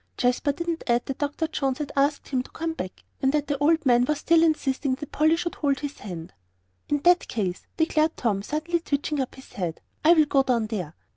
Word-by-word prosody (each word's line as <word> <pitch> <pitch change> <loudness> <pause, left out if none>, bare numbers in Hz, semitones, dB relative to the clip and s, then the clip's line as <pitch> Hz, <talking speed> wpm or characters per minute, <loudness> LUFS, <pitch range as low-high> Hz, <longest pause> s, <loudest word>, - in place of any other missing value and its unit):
Jasper 250 +4 +2
didn't 335 +3 -3
add 240 0 +2
that 270 - -5
Dr. 290 +2 -1
Jones 270 -4 -1
had 295 -2 -4
asked 285 +1 +1
him 260 -2 +1
to - - -12
come 330 0 -3
back, 185 -11 -7 0.2
and 265 - +3
that 295 -1 +1
the 290 - -1
old 320 +2 +3
man 245 -1 +5
was 300 +2 0
still 330 +2 +4
insisting 280 -4 +1
that 295 +1 -9
Polly 315 +2 +3
should 345 +1 -3
hold 280 -2 0
his 290 -1 -5
hand. 175 -3 -7 0.6
"In 290 -1 +1
that 355 +1 +5
case," 185 -5 -3
declared 320 -1 +2
Tom, 210 -5 0
suddenly 310 - -1
twitching 290 -1 -2
up 260 - -4
his 265 - -14
head, 175 -4 -3 0.2
"I 325 +2 +7
will 315 -3 +5
go 280 -1 +3
down 245 -4 +1
there." 185 -8 -4
285 Hz, 220 wpm, -25 LUFS, 245-315 Hz, 0.6 s, I